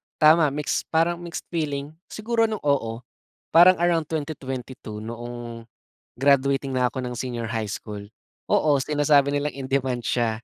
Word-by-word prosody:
tama 155 +1 +6
mix, 150 0 -2
parang 165 +1 +1
mixed 170 -1 -6
feeling. 145 -4 -2 0.2
Siguro 225 +1 0
nung 215 -2 -4
oo, 125 -5 0 0.5
parang 175 +3 +8
around 170 -3 +2
2022 130 -8 -5
noong 120 0 -7 0.5
graduating 140 0 +2
na 125 -1 +2
ako - - -5
ng 125 -1 -4
senior 120 -2 -3
high 110 -2 -2
school. 105 -1 -6 0.5
Oo, 150 -2 +4
sinasabi 145 -1 +3
nilang 145 0 -1
in-demand 130 -2 -1
siya 115 -2 -1
140 Hz, 140 wpm, -24 LUFS, 120-155 Hz, 0.5 s, parang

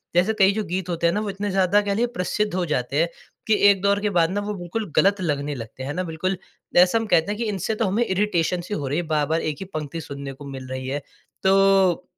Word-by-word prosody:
जैसे 180 +5 +3
कई 195 0 +6
जो 215 +1 -1
गीत 185 -1 -3
होते 170 -1 +1
हैं 170 - +2
ना 210 - 0
वो 215 - -3
इतने 200 +1 -3
ज़्यादा 195 +2 +3
कह 205 -1 -1
लीजिए 235 +4 +1
प्रसिद्ध 210 +2 -1
हो 185 -1 0
जाते 140 -2 -1
हैं 165 - +3 0.4
कि 220 - +4 0.2
एक 195 -2 +3
दौर 200 0 +2
के 210 - +1
बाद 165 -1 +4
ना 205 +2 -1
वो 210 +1 -3
बिल्कुल 185 +2 -5
गलत 200 0 +3
लगने 145 -3 -1
लगते 115 +1 -8
हैं 140 +2 -3
ना, 180 +3 -2
बिल्कुल 180 +3 -2 0.4
जैसा 180 +5 +6
हम 225 - -1
कहते 165 0 +3
हैं 210 - -3
कि 235 - -2
इनसे 205 +2 -2
तो 225 - 0
हमें 205 +5 +1
इरिटेशन 185 -3 0
सी 180 +4 -6
हो 145 -8 -2
रही 140 +3 -1
है, 175 - 0
बार-बार 155 +1 +1
एक 155 -1 -2
ही 190 - -5
पंक्ति 155 +1 -4
सुनने 140 -2 -7
को 140 +2 -12
मिल 135 -2 -7
रही 130 0 -5
है। 140 +2 -2 0.4
तो 195 -2 +4
180 Hz, 260 wpm, -23 LUFS, 155-200 Hz, 0.4 s, कई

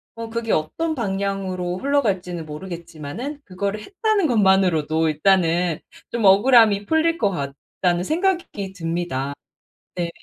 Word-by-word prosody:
어 230 0 -6
그게 230 -1 -2
'어떤 315 - -1
방향으로 195 -5 -2
흘러갈지는 190 - -1
모르겠지만은 170 - -7
그거를 200 +2 -3
했다는 405 - 0
것만으로도 180 - +3
일단은 170 +1 +2 0.3
좀 235 -3 -1
억울함이 205 0 +6
풀릴 320 +5 +2
것 210 -8 +2
같다.'는 175 +3 -2
생각이 335 - -1
듭니다. 165 -6 -3 0.6
네. 175 -2 -2
195 Hz, 305 characters per minute, -22 LUFS, 170-235 Hz, 0.6 s, 억울함이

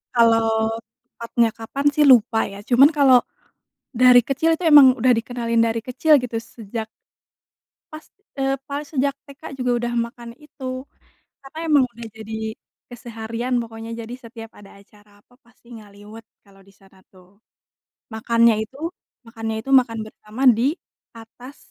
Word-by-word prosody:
Kalau 225 -1 +2 0.3
tepatnya 235 -1 -1
kapan 235 +6 -7
sih 295 +1 +2
lupa 225 -3 +5
ya, 200 0 -10
cuman 265 +6 +5
kalau 270 -4 +5 0.7
dari 250 -1 +6
kecil 280 +7 0
itu 345 +2 -7
emang 280 -4 +8
udah 255 0 +2
dikenalin 230 0 -2
dari 230 0 -1
kecil 285 +5 +2
gitu 240 -2 -5
sejak 225 -1 -8 1.0
pas, 310 0 -10 0.3
eee, 270 0 0
pas 285 +1 -4
sejak 280 -1 -1
TK 280 -1 -15 0.2
juga 250 -1 0 0.2
udah 240 - -4
makan 235 0 -4
itu. 260 -3 -8 0.6
Karena 270 +3 -14
emang 285 -4 +4
udah 235 0 -9
jadi 220 0 -9 0.6
keseharian 235 +1 -5
pokoknya 225 0 -9
jadi 230 +1 -9
setiap 225 -1 -11
ada 200 -1 -16
acara 205 0 -24
apa - - -29
pasti 235 0 -27
ngaliwet 210 +1 -14 0.2
kalau 195 -1 -22
disana 195 -1 -23 0.2
tuh. 185 +2 -22 0.7
Makannya 230 +1 +2
itu 270 - -18 0.5
makannya 225 -1 -5
itu 270 - -8
makan 245 -4 +3
bersama 215 +3 -10 0.2
di 270 +6 +1 0.4
atas 245 +4 -14
235 Hz, 140 wpm, -21 LUFS, 225-260 Hz, 1.0 s, emang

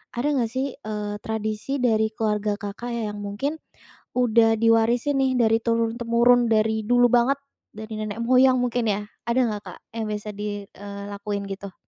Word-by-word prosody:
ada 290 +5 0
nggak 240 -5 +1
sih, 260 +2 -2
eee, 210 -5 -5
tradisi 220 +5 -3
dari 220 -2 +3
keluarga 210 -2 -1
Kakak 210 +3 -6
ya 215 -3 -3
yang 205 - -7
mungkin 210 +10 -3 0.6
udah 230 -2 +4
diwarisin 230 +5 +3
nih 265 -1 +2
dari 225 -1 +4
turun-temurun 235 +1 +3
dari 220 0 +2
dulu 245 +1 +5
banget 245 +4 +3 0.3
dari 220 +1 -8
nenek 215 +1 -4
moyang 255 +2 +5
mungkin 245 -1 0
ya. 205 0 0 0.3
Ada 235 +2 +2
nggak 210 -1 -4
Kak - - -10 0.2
yang 225 - -2
bisa 210 0 -4
di 205 0 -4
eee, 200 0 -9
...lakuin 200 0 -4
gitu? 195 0 -7
225 Hz, 165 wpm, -24 LUFS, 210-245 Hz, 0.6 s, dulu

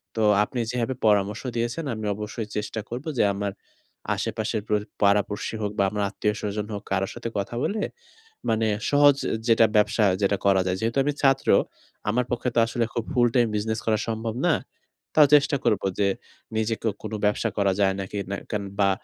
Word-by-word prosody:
তো 110 - -1 0.2
আপনি 120 +3 -4
যেভাবে 125 +1 -1
পরামর্শ 105 0 +2 0.2
দিয়েছেন, 120 +7 -2
আমি 110 -1 -5
অবশ্যই 105 +1 -5
চেষ্টা 105 +1 -3
করব 125 +5 -5
যে, - - +4
আমার 100 0 -2 0.6
আশেপাশের 110 0 -2
প্র - - -1 0.3
পাড়াপর্শী 105 +2 +1
হোক 105 -1 -1
বা - - +5
আমার 105 -1 -1
আত্মীয়স্বজন 105 0 -2
হোক, 100 0 -5
কারো 95 0 +1
সাথে 115 - -5
কথা 100 +4 -3
বলে, 210 0 -1 0.7
মানে 110 0 +2 0.2
সহজ 145 -1 +6 0.3
যেটা 115 0 +6
ব্যবসা 105 +1 +3 0.2
যেটা 100 0 +2
করা 95 -1 +5
যায়। 90 - 0
যেহেতু 115 +4 -1
আমি 145 - +1
ছাত্র, 135 0 +3 0.6
আমার 125 +3 +1
পক্ষে 120 +1 0
তো - - +5
আসলে 115 0 0
খুব 115 - -1
ফুলটাইম 120 -2 +3
বিজনেস 110 +1 -1
করা 110 -1 +2
সম্ভব 110 0 -3
না। - - +4 0.6
তাও 150 -2 +8
চেষ্টা 140 0 +3
করব 105 - +2 0.2
যে, 100 - +3 0.5
নিজেকেও 110 0 0
কোন - - -5
ব্যবসা 105 +2 +1
করা 100 -2 +3
যায় 95 -1 +3
নাকি? 95 +2 -6
না 100 - -1
কেন 105 -2 -1 0.2
বা 100 - +4
110 Hz, 175 wpm, -25 LUFS, 105-120 Hz, 0.7 s, তাও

